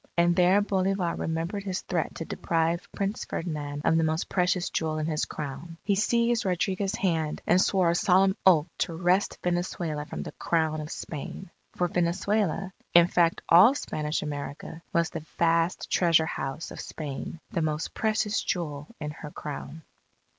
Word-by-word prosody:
And 170 Hz, 0 st, +4 dB
there 185 Hz, +3 st, +5 dB
Bolivar 190 Hz, -3 st, 0 dB
remembered 165 Hz, +5 st, -2 dB
his 190 Hz, -2 st, -3 dB
threat 170 Hz, -4 st, -2 dB
to 165 Hz, -, -5 dB
deprive 165 Hz, +2 st, -1 dB
Prince 200 Hz, +3 st, -2 dB
Ferdinand 150 Hz, -3 st, -4 dB
of 165 Hz, -, +4 dB
the 165 Hz, -, +3 dB
most 160 Hz, +1 st, -1 dB
precious 180 Hz, -1 st, +1 dB
jewel 155 Hz, -1 st, -1 dB
in 155 Hz, -, -1 dB
his 155 Hz, -1 st, 0 dB
Crown. 150 Hz, +3 st, -7 dB
He 200 Hz, -, +2 dB
seized 235 Hz, +3 st, +2 dB
Rodriguez's 190 Hz, +2 st, 0 dB
hand 165 Hz, -7 st, 0 dB
and 180 Hz, +2 st, +4 dB
swore 185 Hz, -4 st, +3 dB
a -, -, +1 dB
solemn 190 Hz, +2 st, +4 dB
oath 165 Hz, -6 st, +6 dB
to 165 Hz, -, -1 dB
wrest 180 Hz, +4 st, +1 dB
Venezuela 175 Hz, -4 st, -2 dB
from -, -, -5 dB
the -, -, -7 dB
Crown 160 Hz, -2 st, 0 dB
of 150 Hz, -, -7 dB
Spain. 165 Hz, +5 st, -6 dB, 0.2 s
For 180 Hz, -, +1 dB
Venezuela 190 Hz, +2 st, 0 dB, 0.2 s
in 170 Hz, 0 st, +9 dB
fact 170 Hz, -1 st, +2 dB
all 195 Hz, +11 st, +7 dB
Spanish 150 Hz, -, -2 dB
America 145 Hz, +2 st, -6 dB
was 170 Hz, -1 st, +1 dB
the 165 Hz, -, -5 dB
vast 165 Hz, +1 st, +2 dB
treasure 165 Hz, -3 st, +4 dB
house 135 Hz, 0 st, -4 dB
of -, -, -6 dB
Spain, 150 Hz, +1 st, -6 dB
the 170 Hz, -, -1 dB
most 155 Hz, 0 st, -2 dB
precious 215 Hz, -1 st, 0 dB
jewel 150 Hz, -5 st, -3 dB
in 150 Hz, -1 st, -4 dB
her 150 Hz, 0 st, -9 dB
Crown. 150 Hz, +1 st, -7 dB
170 Hz, 165 wpm, -27 LUFS, 155-185 Hz, 0.2 s, in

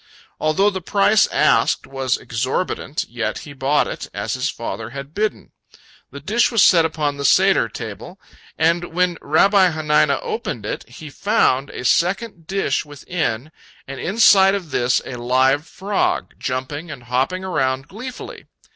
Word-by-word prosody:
Although 175 Hz, +7 st, +2 dB
the 190 Hz, -1 st, -5 dB
price 200 Hz, +3 st, +3 dB
asked -, -, +2 dB
was 135 Hz, -2 st, -1 dB
exorbitant, 130 Hz, +5 st, -3 dB
yet 120 Hz, -1 st, -3 dB
he 145 Hz, -, -10 dB
bought 135 Hz, +2 st, +1 dB
it, -, -, -6 dB
as -, -, -3 dB
his -, -, -1 dB
father 110 Hz, +3 st, -5 dB
had 140 Hz, +3 st, -8 dB
bidden. 215 Hz, +3 st, -2 dB, 0.6 s
The 140 Hz, -, -9 dB
dish 215 Hz, -, +1 dB
was 230 Hz, -4 st, +4 dB
set 165 Hz, -3 st, +6 dB
upon 150 Hz, -3 st, -2 dB
the 140 Hz, -, -5 dB
Seder 190 Hz, -6 st, +4 dB
table, 115 Hz, -, -8 dB, 0.4 s
and 170 Hz, +2 st, +1 dB
when 180 Hz, -2 st, +1 dB
Rabbi 190 Hz, +5 st, +4 dB
Hanina 155 Hz, -2 st, +2 dB
opened 455 Hz, -1 st, -4 dB
it, -, -, -5 dB
he 155 Hz, -2 st, -10 dB
found 140 Hz, -, +1 dB
a 125 Hz, -, -7 dB
second 180 Hz, -, 0 dB
dish 195 Hz, -8 st, 0 dB
within, 145 Hz, -3 st, -4 dB, 0.4 s
and 135 Hz, -1 st, -7 dB
inside 195 Hz, -, +5 dB
of 180 Hz, -6 st, -6 dB
this 125 Hz, 0 st, +1 dB
a 125 Hz, -, -6 dB
live 130 Hz, +5 st, +2 dB
frog, 200 Hz, +1 st, -1 dB
jumping 135 Hz, +5 st, -4 dB
and 140 Hz, -5 st, -9 dB
hopping 130 Hz, +10 st, -1 dB
around 135 Hz, -7 st, -1 dB
gleefully. 250 Hz, +7 st, -9 dB
155 Hz, 150 wpm, -20 LUFS, 130-190 Hz, 0.6 s, set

